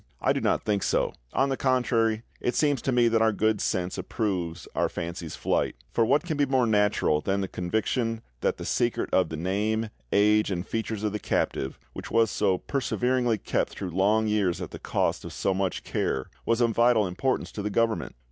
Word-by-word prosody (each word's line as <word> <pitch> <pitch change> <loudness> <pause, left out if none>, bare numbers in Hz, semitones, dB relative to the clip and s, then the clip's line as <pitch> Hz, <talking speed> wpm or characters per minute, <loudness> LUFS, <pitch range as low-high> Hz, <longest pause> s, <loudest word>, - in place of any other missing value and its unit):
I - - +2
do - - -2
not - - +1
think 105 -2 0
so; - - +1 0.2
on 135 +1 +2
the 135 - 0
contrary, 115 -4 +1 0.2
it 125 - -1
seems 145 -5 +2
to 135 - 0
me 120 -1 +4
that 115 -1 +2
our 110 0 +4
good 110 0 +1
sense 90 0 -1
approves 90 -6 -3
our - - +1
fancy's 85 -1 -5
flight. - - 0 0.2
For 115 - +2
what 140 +8 +3
can 160 -4 -3
be 145 -1 +2
more 130 -2 +3
natural 105 -8 +2
than 100 +3 0
the 95 - -2
conviction 110 +6 -1 0.2
that - - 0
the - - -6
secret 120 -1 0
of 95 -3 +3
the 80 - -5
name, 105 +6 -1 0.2
age, 105 +1 +4
and 90 -1 -2
features 110 -2 -3
of 105 - 0
the 105 - -3
captive, 65 -7 -1 0.2
which - - -7
was 115 -1 +3
so 95 -3 +2
perseveringly 125 -1 0
kept - - -1
through 95 -3 -5
long 105 +5 +2
years 105 -5 +1
at - - -6
the - - -8
cost - - -1
of - - -8
so 95 - 0
much 95 -2 -2
care, 65 - -1 0.2
was 115 +1 +2
of 115 -1 +3
vital 115 -1 +4
importance 110 +9 -1
to 105 - -5
the 105 - -2
Government? 115 +2 0
110 Hz, 205 wpm, -27 LUFS, 95-120 Hz, 0.2 s, me